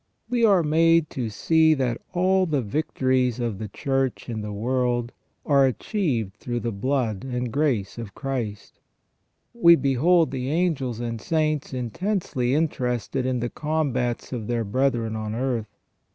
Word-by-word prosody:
We 240 -1 +1
are 195 -6 +5
made 165 +1 +3
to 120 -4 -3
see 160 +8 +3
that 125 -4 -1
all 185 +1 +2
the 145 -5 0
victories 130 0 0
of 115 -5 -2
the 110 - -4
Church 135 +4 -2
in 110 -2 -3
the 105 0 -5
world 120 +2 0 0.3
are 140 -2 +5
achieved 125 - -2
through 120 +1 -3
the 120 - -2
blood 115 -1 -1
and 125 -1 -3
the - - -4
grace 125 -7 0
of 110 -4 -8
Christ. 120 -7 -5 0.7
We 170 -8 +7
behold 160 +4 +3
the 130 -1 -3
angels 145 -8 0
and 115 -2 -4
saints 155 -1 0
intensely 130 - -1
interested 130 -4 -1
in 125 -2 -1
the 120 - -1
combats 135 -7 -1
of 115 -4 -4
their 120 -1 0
brethren 115 0 0
on 110 0 -4
earth. 120 -3 -2
130 Hz, 150 wpm, -24 LUFS, 115-155 Hz, 0.7 s, We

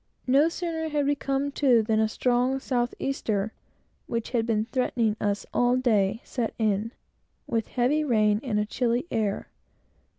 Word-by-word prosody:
No 275 +5 +4
sooner 330 -2 -3
had 295 -2 0
we 285 - +3
come 280 0 -1
to, 255 -6 +3
than 220 0 +1
a 220 - +3
strong 250 +3 +1
south 245 -2 -1
easter, 215 -6 -2 0.5
which 230 -1 -3
had 235 -2 0
been 215 -2 +1
threatening 235 -4 +1
us 205 -1 -1
all 245 +1 +3
day, 225 -4 +1
set 240 -3 -3
in, 215 0 0 0.5
with 225 -2 -1
heavy 270 +5 +1
rain 215 -6 +3
and 220 -6 -1
a 210 - +1
chilly 240 +2 0
atmosphere. 210 -3 -1
240 Hz, 160 wpm, -26 LUFS, 220-270 Hz, 0.5 s, No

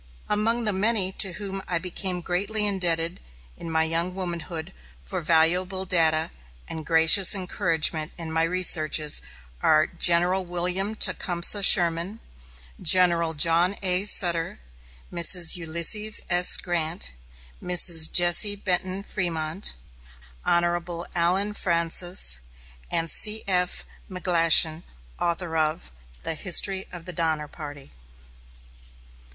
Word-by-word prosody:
Among 225 +3 -1
the 210 -2 +1
many 200 -1 0
to 190 -3 +2
whom 195 +1 -4
I 175 - -2
became 180 +1 -3
greatly 200 +5 0
indebted 175 -4 0 0.4
in 165 - -10
my 160 0 0
young 165 +3 -4
womanhood 170 -3 -6 0.3
for 60 - -6
valuable 180 +4 +1
data 160 -3 +1 0.4
and 160 - -8
gracious 165 +5 +4
encouragement 165 -4 -1
in 165 -2 -6
my 160 0 -1
researches 165 -3 +1 0.4
are 155 0 +2
General 175 +2 +2
William 180 +4 -2
Tecumseh 180 0 +1
Sherman, 175 +2 +3 0.6
General 170 -2 +4
John 170 +5 +2
A. 185 0 0
Sutter, 170 -5 +3 0.5
Mrs. 170 0 +4
Ulysses 170 +6 -1
S. 180 +1 +4
Grant, 170 - -4 0.5
Mrs. 175 -2 +3
Jessie 175 +4 +4
Benton 185 0 -3
Frémont, 170 -1 -4 0.7
Honorable 175 0 -2
Allen 185 +4 -1
Francis, 170 - +1 0.5
and 165 -1 -2
C.F. 195 -4 0 0.3
McGlashan, 165 -3 +2 0.4
author 170 -1 -3
of 155 - -3 0.3
the 165 - -4
"History 190 +3 0
of 175 -2 -10
the 180 - -7
Donner 160 -2 -3
Party." 145 - -11
175 Hz, 110 wpm, -23 LUFS, 165-185 Hz, 0.7 s, gracious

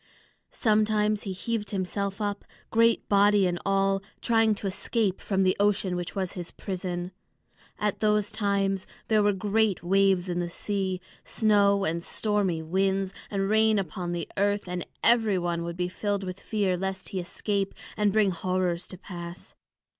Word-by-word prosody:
Sometimes 215 -1 +2
he 195 - -4
heaved 210 +3 -3
himself 195 +1 -2
up, 205 -1 -2 0.3
great 230 +1 +3
body 205 0 +5
and 175 -1 0
all, 195 0 +2 0.2
trying 225 -2 +3
to 200 - -8
escape 195 +1 -1
from 195 -1 +1
the 185 0 +3
ocean 200 -2 +2
which 175 +2 -4
was 190 -2 -1
his 175 -2 -6
prison. 180 -2 -4 0.7
At 210 -1 -1
those 210 0 +2
times 200 -2 0 0.2
there 215 -1 +4
were 205 0 +4
great 205 0 +1
waves 190 0 +3
in 175 -1 -1
the 175 -1 -2
sea, 190 0 -2 0.2
snow 200 -2 +3
and 170 +1 -1
stormy 200 -7 -1
winds 190 +3 0 0.2
and 195 -1 -1
rain 220 +1 +4
upon 180 -1 -3
the 175 -2 -3
earth, 205 0 +1
and 180 0 -4 0.2
every 225 -5 +5
one 175 -1 -1
would 170 0 -5
be 180 0 0
filled 200 +2 -2
with 185 0 -5
fear 200 -4 0
lest 190 +1 -4
he 190 - -3
escape 195 +2 -2 0.2
and 210 -1 +2
bring 210 -1 +3
horrors 180 -1 -1
to 185 - -9
pass. 175 -1 -8
195 Hz, 160 wpm, -27 LUFS, 185-210 Hz, 0.7 s, body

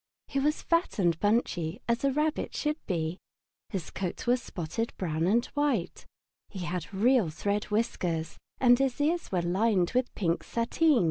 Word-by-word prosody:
He 275 - -2
was 300 +3 0
fat 335 +1 +1
and 175 -4 +2
bunchy, 205 -4 0
as 235 +2 +1
a 275 - +3
rabbit 300 +3 -1
should 300 +1 -1
be; 165 -1 -1 0.5
his 190 -7 -4
coat 185 -2 -4
was 245 +1 +3
spotted 185 +7 -4
brown 165 -2 0
and 235 +5 +3
white, 285 - -1 0.4
he 190 -4 -5
had 175 0 -4
real 220 -1 +3
thread 200 +6 -1
whiskers, 175 -8 -1 0.2
and 245 -1 +6
his 270 -1 0
ears 325 +4 0
were 180 -2 +1
lined 185 +1 +2
with 255 0 +1
pink 170 -4 0
sateen. 255 +5 +2
210 Hz, 160 wpm, -29 LUFS, 175-260 Hz, 0.5 s, and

